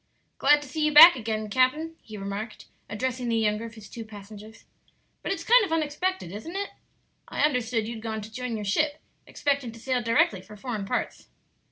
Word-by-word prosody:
"Glad 295 0 +5
to - - -11
see 305 +4 -3
you 305 - +3
back 315 +3 +11
again, 220 -3 -3
capt'n," 260 +9 +1
he 215 -1 -10
remarked, 200 +2 -6 0.2
addressing 250 +3 -3
the 230 - +1
younger 215 0 0
of 225 0 -10
his 215 -2 -12
two 230 +3 -8
passengers; 215 0 -12 0.6
"but - - -3
it's - - -3
kind 485 0 +6
of 390 - -3
unexpected, 325 - -1
isn't 220 - -7
it? 400 +1 -3 0.6
I - - -3
understood 245 -6 +1
you'd 230 -1 -6
gone 220 -1 -4
to 215 - -10
join 250 -1 -4
your 210 -1 -4
ship, 295 +9 +1 0.3
expecting 280 -4 -1
to 230 - -12
sail 255 +1 -1
directly 230 -4 +2
for 210 +3 -13
foreign 215 -2 -4
parts." - - -3
230 Hz, 195 wpm, -26 LUFS, 215-290 Hz, 0.6 s, back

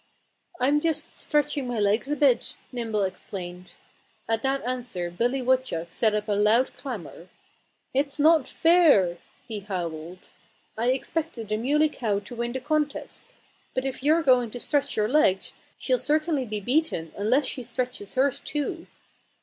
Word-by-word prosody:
"I'm 280 +4 +3
just 320 0 -2
stretching 295 -3 0
my 245 -1 -2
legs 210 +6 +1
a 295 - +1
bit," 275 -5 +2 0.2
Nimble 225 -4 -1
explained. 180 -1 -6 0.5
At 225 0 0
that 270 +1 0
answer 240 -9 -3
Billy 245 +8 0
Woodchuck 250 -10 0
set 220 -2 +2
up 210 0 -2
a - - -1
loud 210 +5 +3
clamor. 190 - -7 0.6
"It's 280 +2 0
not 310 -1 +5
fair!" 300 - +4 0.3
he 220 -3 -4
howled. 175 -3 -6 0.4
"I 230 +2 -1
expected 260 -2 -2
the 215 - 0
Muley 295 +7 +2
Cow 220 -8 -1
to 205 +5 -7
win 235 0 -2
the 260 - -2
contest. 300 +2 -2 0.5
But 255 - -1
if 265 -1 -3
you're 315 +4 +3
going 250 -4 +4
to 245 - -7
stretch 285 0 0
your 210 0 +2
legs 220 -8 +2 0.2
she'll - - +1
certainly 305 -2 +1
be 215 -2 -3
beaten 245 - 0
unless 245 +8 +2
she 255 - -3
stretches 245 -3 -4
hers 265 +1 +2
too." 320 +4 -4
250 Hz, 155 wpm, -26 LUFS, 210-285 Hz, 0.6 s, not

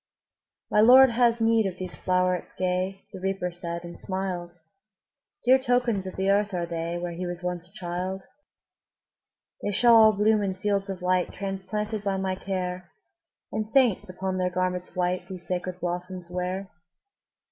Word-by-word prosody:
``My 210 - +6
Lord 260 +2 +8
has 235 0 +3
need 225 -2 +3
of 185 -1 -5
these 185 -1 -5
flowerets 180 -1 0
gay,'' 185 +1 -1
The - - -7
Reaper 190 -1 -2
said, 170 0 -5
and 170 0 -9
smiled; 185 -2 -3 1.0
``Dear 260 +1 +6
tokens 245 -6 +1
of 185 - -7
the 190 +1 +1
earth 205 -1 +1
are 175 -1 -1
they, 170 0 -3
Where 175 0 -4
he 175 +2 -4
was 175 0 -6
once 180 -1 -3
a - - -25
child. 185 0 -4 1.4
``They 205 - 0
shall 235 +4 +6
all 220 -1 +8
bloom 210 +1 +3
in 195 -2 -1
fields 195 +1 -1
of 190 -2 -5
light, 180 0 +1
Transplanted 200 +2 -4
by 195 -1 0
my 190 0 -1
care, 185 -2 -4 0.6
And 215 0 -2
saints, 225 -6 +3
upon 185 0 -3
their 180 0 +1
garments 180 0 -2
white, 180 0 -1
These 185 -2 -7
sacred 180 0 -3
blossoms 180 0 -4
wear.'' 180 +2 -3
185 Hz, 165 wpm, -26 LUFS, 180-205 Hz, 1.4 s, Lord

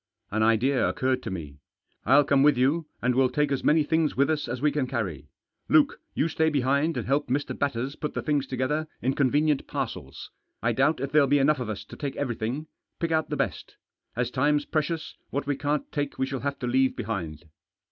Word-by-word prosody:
An 110 +2 0
idea 115 +4 +3
occurred 130 0 0
to - - -5
me. 75 -7 -7 0.5
"I'll 140 +4 +6
come 140 -1 +3
with 145 -2 +5
you, 145 +6 +2 0.2
and 125 +1 +3
we'll 130 0 +3
take 145 +2 0
as 135 - -1
many 155 0 +4
things 160 0 +1
with 140 +3 +3
us 150 -2 -1
as 120 - -3
we 150 +3 +2
can 140 -2 -1
carry. 95 - -3 0.4
Luke, - - +4
you 155 - +2
stay 160 0 +1
behind 140 +3 +1
and - - -2
help 140 +3 +1
Mr. 140 +4 -1
Batters 135 0 -2
put 150 - -5
the - - -2
things 145 -3 0
together 135 +5 -1 0.2
in 130 +2 +2
convenient 145 +2 +2
parcels. - - -5 0.3
I 115 - +1
doubt 135 +4 +2
if 140 0 -3
there'll 145 -2 +5
be 145 - +4
enough 140 +1 +3
of 120 -3 -4
us 105 - -4
to - - -11
take 140 -3 -4
everything. 125 +2 -3 0.3
Pick 165 -1 -1
out 160 -1 +1
the - - -2
best. - - -3 0.4
As 125 +1 -1
time's 145 +3 +2
precious, 155 +1 -2 0.2
what 140 +1 -2
we 145 0 0
can't 145 +1 -2
take 145 -2 -3
we 130 - +1
shall 135 0 -4
have 140 +3 -3
to - - -5
leave 130 +2 +2
behind." 85 -8 -4
140 Hz, 215 wpm, -26 LUFS, 125-150 Hz, 0.5 s, I'll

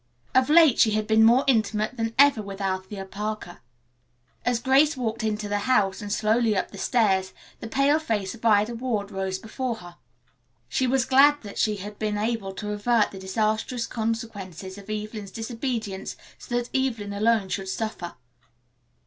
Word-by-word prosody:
Of 260 +1 +3
late 315 -5 +6
she 220 - +5
had 215 0 0
been 220 +1 +4
more 240 +4 +6
intimate 220 -2 +1
than 225 -1 -3
ever 280 -4 +6
with 200 -1 -8
Althea 195 0 -3
Parker. 210 -2 -5 0.8
As 245 -1 +1
Grace 275 +4 +3
walked 230 -2 -2
into 210 -1 -2
the 205 0 -1
house 205 -5 +2
and 205 -1 -6
slowly 215 0 +2
up - - -2
the - - -10
stairs 190 -6 +1 0.3
the - - -6
pale 275 +5 +3
face 210 -11 -2
of 235 - -14
Ida 215 0 +3
Ward 225 -4 -3
rose 190 -1 -2
before 235 +4 -4
her. 175 -4 -13 0.7
She 255 - 0
was 255 -1 +2
glad 280 +2 +5
that 205 - -7
she 215 -1 +2
had 205 +1 -8
been 210 -1 -1
able 215 -2 -2
to 210 +2 -5
avert 210 +1 +2
the 195 - -9
disastrous 215 +5 -1
consequences 210 -5 -4
of 200 - -14
Evelyn's 215 -1 -5
disobedience 225 -2 -4 0.2
so 240 - -5
that 245 0 -4
Evelyn 230 -7 -1
alone 215 0 +2
should 190 -1 -3
suffer. 200 -4 -4
220 Hz, 170 wpm, -25 LUFS, 200-240 Hz, 0.8 s, late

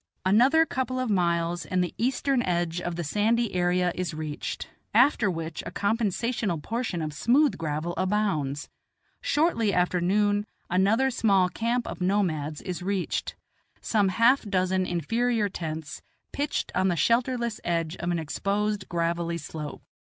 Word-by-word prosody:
Another 255 +12 +5
couple 255 -3 -2
of 255 -3 -1
miles 170 -2 +1
and 185 -1 0
the 175 - -4
eastern 260 +2 +1
edge 175 -3 -1
of 175 -1 -3
the 175 - -3
sandy 220 +7 +1
area 180 0 +2
I - - -2
is 180 -3 -3
reached, 155 -1 -4 0.3
after 240 -3 +5
which 165 -2 -4
a - - -5
compensational 220 -2 0
proportion 220 -2 -3
of 155 -1 -4
smooth 250 - +3
gravel 160 +1 -3
abounds. 185 -9 0 0.5
Shortly 290 -9 +2
after 180 -1 +1
noon 205 +3 +2 0.2
another 210 +9 +3
small 195 -6 +3
camp 235 +5 -1
of - - -6
nomads 165 -6 0
I - - -6
is 180 -2 -3
reached, 190 0 -2 0.4
some 210 -3 +2
half 230 +8 +4
dozen 185 -2 0
inferior 225 +6 0
tents, 160 -4 -5 0.3
pitched 290 +1 -2
on 190 - +2
the 180 - +1
shelterless 235 +3 +1
edge 165 -1 -1
of 175 - -3
an 175 - +1
exposed 200 +5 -2
gravelly 170 0 -1
slope. 150 -2 -7
185 Hz, 150 wpm, -27 LUFS, 170-230 Hz, 0.5 s, Another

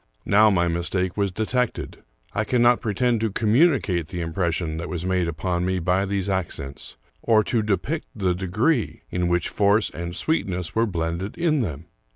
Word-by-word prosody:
Now 105 +2 +5
my 85 -4 +2
mistake 85 +2 -1
was 100 -2 0
detected. 115 +5 -2 0.3
I 110 - 0
cannot 120 +1 +3
pretend 115 +2 +1
to 115 - +1
communicate 110 - +2
the 85 +1 -5
impression 80 -1 -1
that 85 +2 -5
was 90 -1 -4
made 95 -2 +1
upon 85 +2 -2
me 95 +1 0
by 90 +3 +1
these 100 -1 -1
accents, 80 -10 -4 0.2
or 110 -2 +4
to 115 +2 0
depict 110 - -1
the 95 -4 +1
degree 105 - 0
in 90 -1 0
which 85 0 +1
force 105 +1 +2
and 85 +1 -6
sweetness 90 - -1
were 115 +1 +2
blended 85 +1 -3
in 160 -4 +2
them. 80 - -4
95 Hz, 170 wpm, -24 LUFS, 85-110 Hz, 0.3 s, Now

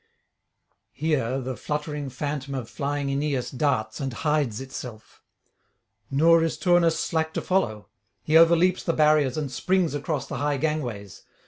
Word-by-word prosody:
Here 135 -4 0
the 130 0 -4
fluttering 150 +3 -4
phantom 140 +1 -4
of 125 -4 -4
flying 145 -1 -2
Aeneas 140 -2 -1
darts 125 -6 -1
and 135 -1 -3
hides 145 -4 0
itself. 125 -4 -9 0.9
Nor 165 +4 +4
is 165 - -1
Turnus 175 -2 +3
slack 160 -1 -1
to - - -1
follow; 115 - 0 0.4
he 155 +5 0
overleaps 170 +2 +5
the 165 - -1
barriers 150 -4 +3
and 145 -4 -3
springs 180 +5 +1
across 145 0 -2
the 135 - -5
high 145 +2 0
gangways. 125 - -3
145 Hz, 140 wpm, -25 LUFS, 130-160 Hz, 0.9 s, overleaps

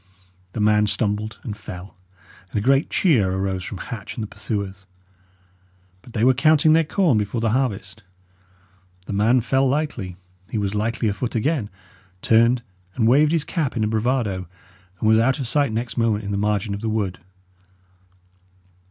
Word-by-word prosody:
The - - -4
man 105 0 +3
stumbled 105 +1 -2
and 110 -6 -5
fell, 95 -2 -9 0.5
and - - -4
a 100 - -1
great 135 +2 +3
cheer 120 - +3
arose 95 -1 -2
from 95 - -6
Hatch 105 +2 -7
and 115 - -4
the - - -4
pursuers. 100 -3 -5 1.1
But 120 - -15
they 110 - 0
were 130 +1 +6
counting 155 +3 +4
their 165 +1 +5
corn 160 - +2
before 105 +3 -2
the 115 -1 +1
harvest. 110 -5 -2 1.0
The 100 - -5
man 115 +5 +3
fell 135 +3 +2
lightly; 125 - -2 0.3
he - - -3
was 100 -1 -1
lightly 110 +2 -1
afoot 105 +4 -2
again, 120 -1 0 0.5
turned 115 +2 +4 0.3
and 115 -3 +2
waved 145 +5 +5
his 165 -3 +2
cap 150 -8 -2
in 110 - +1
a - - +1
bravado, 110 -4 -1 0.5
and 110 - 0
was 110 0 +5
out 130 +4 +2
of 135 - -3
sight 140 +2 +1
next 115 +1 -3
moment 110 -2 +1
in 100 - -4
the - - -1
margin 105 0 0
of 100 - -5
the 115 - -2
wood. 105 -4 -2
110 Hz, 170 wpm, -22 LUFS, 105-130 Hz, 1.1 s, were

